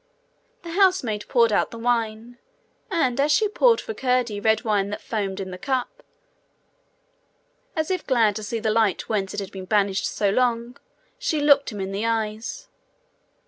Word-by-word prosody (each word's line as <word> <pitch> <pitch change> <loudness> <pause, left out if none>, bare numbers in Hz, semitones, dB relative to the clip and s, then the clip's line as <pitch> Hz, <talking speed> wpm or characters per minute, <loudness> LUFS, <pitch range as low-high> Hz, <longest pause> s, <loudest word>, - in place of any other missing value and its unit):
The 340 - -7
housemaid 345 - +2
poured 235 -3 +3
out - - +2
the 230 - -9
wine; 230 0 -2 0.5
and 275 - 0
as 295 +2 +2
she 430 +7 +3
poured 460 +3 +3
for 445 - -5
Curdie 250 - 0
red 220 +2 +2
wine 205 -3 +1
that 210 - -4
foamed 200 -4 -3
in 190 -1 -5
the 180 - -8
cup, 270 - -2 1.7
as 315 +1 -1
if 370 -3 -2
glad 225 -6 +3
to - - -5
see 230 +2 -3
the 220 -1 0
light 215 -3 +1
whence 200 -3 -1
it - - -2
had 200 -1 -6
been 190 -2 -8
banished 200 -1 +1
so 200 -2 0
long, 240 +1 0 0.4
she 415 -12 0
looked 285 -2 +4
him 210 - -7
in 190 0 -3
the 205 +3 -2
eyes. 225 - -3
230 Hz, 175 wpm, -24 LUFS, 210-265 Hz, 1.7 s, looked